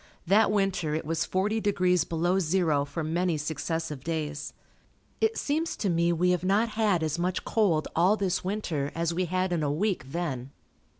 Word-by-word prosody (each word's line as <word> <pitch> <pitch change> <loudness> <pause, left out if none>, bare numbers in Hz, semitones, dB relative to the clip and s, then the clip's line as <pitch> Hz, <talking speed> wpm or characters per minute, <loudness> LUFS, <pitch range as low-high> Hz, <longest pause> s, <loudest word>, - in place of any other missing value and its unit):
That 205 +4 +4
winter 195 -7 0
it 160 - -3
was 165 +1 -1
forty 210 +4 0
degrees 180 -5 +2
below 175 +3 +1
zero 160 -5 +1
for 160 +3 -4
many 170 +1 0
successive 155 -1 -3
days. 150 -2 -3 0.7
It 445 0 +1
seems 315 +3 -1
to 195 - 0
me 170 0 +2
we 180 +2 +2
have 180 -1 0
not 205 +5 +2
had 210 -6 +1
as 155 +1 -1
much 180 +1 -1
cold 185 -9 +2
all 185 +6 +4
this 195 -2 -1
winter 180 -8 -2
as 170 0 0
we 180 +2 0
had 185 +1 0
in 170 - 0
a 145 -1 0
week 170 -4 -1
then. 140 -7 -3
175 Hz, 180 wpm, -28 LUFS, 160-195 Hz, 0.7 s, That